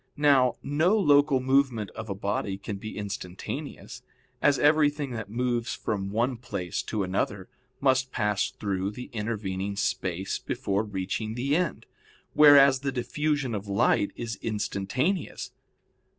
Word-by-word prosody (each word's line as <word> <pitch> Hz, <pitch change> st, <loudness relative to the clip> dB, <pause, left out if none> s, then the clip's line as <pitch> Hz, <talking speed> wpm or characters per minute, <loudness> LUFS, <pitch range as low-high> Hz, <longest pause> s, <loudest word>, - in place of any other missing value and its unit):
Now 140 Hz, -4 st, +4 dB
no 160 Hz, +9 st, +2 dB
local 145 Hz, -6 st, +4 dB
movement 130 Hz, -5 st, +1 dB
of 110 Hz, 0 st, -8 dB
a 100 Hz, -, -2 dB
body 100 Hz, 0 st, -2 dB
can 100 Hz, 0 st, -6 dB
be 110 Hz, +2 st, -7 dB
instantaneous, 100 Hz, -3 st, -6 dB, 0.4 s
as 145 Hz, -2 st, +4 dB
everything 145 Hz, -2 st, +3 dB
that 110 Hz, -4 st, -5 dB
moves 120 Hz, 0 st, -1 dB
from 100 Hz, -2 st, -3 dB
one 120 Hz, +4 st, 0 dB
place 95 Hz, -8 st, -4 dB
to 105 Hz, -3 st, -1 dB
another 95 Hz, +1 st, -2 dB, 0.3 s
must 130 Hz, -1 st, +2 dB
pass 105 Hz, -2 st, 0 dB
through 100 Hz, -2 st, -2 dB
the 125 Hz, +5 st, -9 dB
intervening 100 Hz, -3 st, -3 dB
space 95 Hz, -1 st, -2 dB
before 100 Hz, +1 st, -1 dB
reaching 105 Hz, +2 st, -3 dB
the 135 Hz, +4 st, 0 dB
end: 180 Hz, -2 st, -1 dB, 0.5 s
whereas 140 Hz, -3 st, +7 dB
the 135 Hz, 0 st, -2 dB
diffusion 145 Hz, +1 st, -1 dB
of 100 Hz, -1 st, -4 dB
light 100 Hz, 0 st, +2 dB
is 115 Hz, -3 st, -5 dB
instantaneous. 115 Hz, -, -2 dB
115 Hz, 135 wpm, -27 LUFS, 100-140 Hz, 0.5 s, whereas